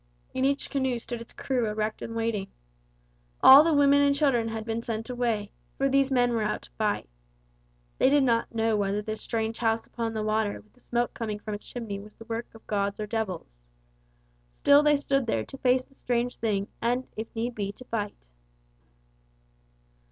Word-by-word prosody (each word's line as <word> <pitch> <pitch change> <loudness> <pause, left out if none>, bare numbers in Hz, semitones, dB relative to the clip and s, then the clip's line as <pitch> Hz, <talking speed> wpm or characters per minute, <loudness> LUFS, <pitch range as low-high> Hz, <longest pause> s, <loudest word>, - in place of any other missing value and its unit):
In 260 - 0
each 280 +1 0
canoe 265 -3 0
stood 235 0 -6
its 230 - -11
crew 250 -4 -1
erect 215 0 -2
and 230 - -6
waiting. 225 -4 -1 1.0
All 275 +3 +11
the 330 - +2
women 285 -1 +5
and 280 0 +4
children 270 -6 +2
had 225 -1 -4
been 225 0 -2
sent 225 +1 -4
away, 230 -5 -1 0.3
for 275 - +2
these 275 0 +3
men 245 -2 +3
were 230 - 0
out 210 0 -1
to - - -14
fight. - - -1 0.9
They - - +5
did 285 0 +4
not 230 -3 +1
know 225 0 +2
whether 205 0 0
this 215 0 -5
strange 225 -1 -2
house 225 -1 +1
upon 230 -1 -4
the 215 - -1
water 215 -1 0
with 215 - -22
the 250 - -26
smoke 240 -1 -1
coming 215 -3 -3
from 210 0 -6
its 205 - -7
chimney 220 -5 -5
was 210 +1 -13
the 225 - -13
work 230 +1 -4
of 225 - -15
gods 200 -1 -1
or 215 - -2
devils. 190 - -4 0.9
Still 285 - +5
they 295 -1 +4
stood 275 -3 0
there - - 0
to 270 - -9
face 255 0 +3
the 275 - -26
strange 245 -2 -1
thing 205 -3 -1
and, 245 +2 0
if 220 +1 -4
need 235 +2 -2
be, 200 -3 -3
to 255 - -13
fight. 210 - -4
230 Hz, 195 wpm, -27 LUFS, 215-255 Hz, 1.0 s, All